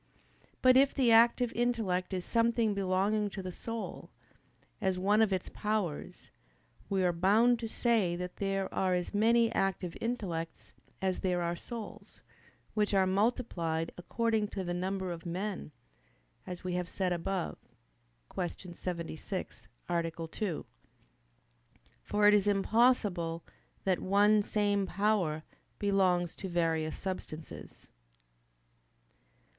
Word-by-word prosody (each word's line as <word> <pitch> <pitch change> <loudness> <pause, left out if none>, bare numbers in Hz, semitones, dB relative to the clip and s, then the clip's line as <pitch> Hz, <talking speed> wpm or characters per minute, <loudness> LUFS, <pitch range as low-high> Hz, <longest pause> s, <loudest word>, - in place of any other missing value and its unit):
But 255 0 +7
if 275 +1 +4
the 255 -4 +4
active 235 +1 +5
intellect 225 -7 0
is 185 -2 -3
something 230 -2 +2
belonging 200 +2 +1
to 195 -1 -6
the 185 - -4
soul, 230 +4 -6 0.7
as 190 -2 +1
one 205 +4 +3
of 220 -3 +3
its 185 -1 -1
powers, 210 -8 -3 0.6
we 195 -1 +1
are 180 -1 +3
bound 215 +8 +4
to 230 - -3
say 220 -6 +1
that 180 0 -6
there 195 -1 -1
are 185 -1 +1
as 180 +2 -3
many 230 +2 +4
active 190 -3 -1
intellects 180 -9 -4 0.3
as 185 -1 0
there 180 -2 0
are 170 0 -1
souls, 230 +4 -9 0.5
which 210 -1 +1
are 190 -1 +4
multiplied 185 -6 0
according 220 +4 0
to 195 -2 -4
the 175 -1 -2
number 185 +1 -2
of 165 -1 -6
men, 185 0 -4 0.8
as 180 -1 -6
we 180 -1 -2
have 180 0 -2
said 185 -2 0
above 180 +1 -3 0.7
(Q. 180 0 -4
76, 170 - -5 0.2
A. 170 -1 0 0.2
2). 180 - -3 1.4
For 210 0 +2
it 210 - +7
is 205 -1 +4
impossible 195 -5 +2 0.4
that 190 -2 +1
one 205 +2 +4
same 205 -1 +1
power 185 -6 +1 0.3
belong 190 -3 +2
to 190 +3 -7
various 165 -2 0
substances. 165 -4 -7
195 Hz, 125 wpm, -31 LUFS, 175-215 Hz, 1.4 s, But